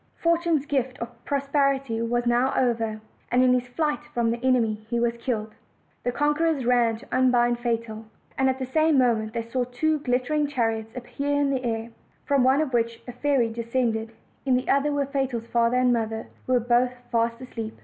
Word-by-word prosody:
Fortune's 335 -3 +1
gift 265 -4 -1
of 235 0 -8
prosperity 275 -4 0
was 240 +1 0
now 240 +2 +2
over, 225 -3 0 0.3
and 250 +1 +4
in 250 -1 +5
his 250 0 0
flight 295 +3 -1
from 235 -1 +2
the 235 +1 -4
enemy 230 -5 +2
he 235 -1 0
was 235 0 +1
killed. 225 -3 -3 0.5
The 245 - 0
conquerors 295 0 +1
ran 240 -2 +3
to 225 - -7
unbind 240 -2 +3
Fatal; 230 -2 -3 0.3
and 265 0 +2
at 260 - 0
the 260 - -3
same 310 +3 +2
mo 250 -2 +5
ment 220 0 -4
they 230 -1 -2
saw 245 +2 -1
two 300 +6 0
glittering 275 +3 0
chariots 225 -4 -2
appear 280 +3 -2
in 285 -1 +2
the 260 -2 -1
air, 230 -1 -3 0.3
from 280 -3 +3
one 265 +3 +4
of 285 -5 -2
which 230 -1 0
a - - -5
fairy 255 -2 +1
descended; 230 -1 -1 0.3
in 260 -2 +2
the 250 - -1
other 280 +2 +3
were 285 -1 0
Fatal's 270 -4 -2
father 235 +1 +2
and 250 -1 +3
mother, 225 -1 -2 0.2
who 255 - +1
were 250 - +5
both 245 +1 +2 0.2
fast 230 0 +1
asleep. 225 -3 -7
245 Hz, 195 wpm, -25 LUFS, 230-275 Hz, 0.5 s, in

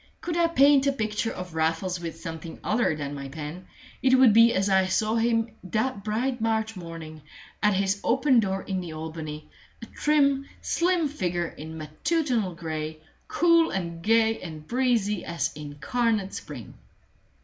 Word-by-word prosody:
Could 340 - -3
I 340 -1 +3
paint 280 -3 +5
a - - +4
picture 220 -3 -2
of 180 -2 -7
Raffles 165 +3 0
with 165 -1 -6
something 165 0 -7
other 215 -7 +1
than 145 -1 -5
my 140 -1 -6
pen, 155 +5 -7 0.3
it 260 0 +5
would 255 -5 +7
be 230 +1 +7
as 195 -3 +1
I 190 -1 +3
saw 215 +4 +1
him 230 0 +1
that 215 +2 -2
bright 240 +3 -1
March 220 -1 0
morning, 165 -3 -8 0.4
at 210 -2 +3
his 195 +1 0
open 265 +1 +4
door 195 -3 -1
in 190 -2 -3
the 170 -3 -7
Albany, 155 -1 -6 0.3
a 230 - -8
trim, 280 +1 +2
slim 345 -2 +1
figure 175 - -2
in 160 +2 -9
matutinal 215 - -1
gray, 155 -2 -4 0.3
cool 335 -1 +4
and 170 -3 -4
gay 225 +2 +3
and 155 -3 -8
breezy 235 -6 +1
as 170 0 -2
incarnate 195 - -1
spring. - - -8
200 Hz, 160 wpm, -26 LUFS, 165-240 Hz, 0.4 s, would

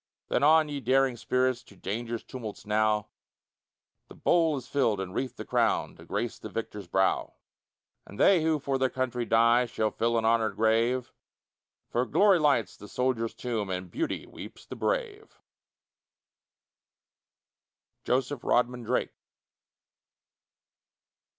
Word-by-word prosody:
Then - - +1
on, 155 +2 +5
ye 145 -1 -4
daring 135 0 +2
spirits, 125 +1 0
To 105 - -18
danger's 115 +5 -4
tumults 115 -5 -8
now, 105 0 +1 1.0
The - - -13
bowl 165 -4 +2
is 130 -2 -8
filled 120 -8 +1
and 95 -1 -5
wreathed 130 +3 -3
the - - -6
crown, - - +1
To - - -14
grace - - -3
the - - -8
victor's 105 -2 -6
brow; 95 0 +1 0.7
And 100 - -12
they 190 -4 +5
who 160 0 +2
for 135 -1 -2
their 130 0 +2
country 125 -2 -2
die, 115 +2 +4
Shall 110 -2 -1
fill 115 0 0
an 115 - 0
honored 115 -1 +2
grave; 115 +3 +1 0.8
For 125 +2 0
glory 200 -3 +4
lights 140 - +2
the 105 - -12
soldier's 120 -1 -1
tomb, 115 -5 -3
And 90 0 -4
beauty 330 +3 -3
weeps - - -11
the - - -8
brave. 440 -4 -3 2.7
JOSEPH 130 +1 -1
RODMAN 125 0 +1
DRAKE. 115 - -1
125 Hz, 135 wpm, -28 LUFS, 110-135 Hz, 2.7 s, on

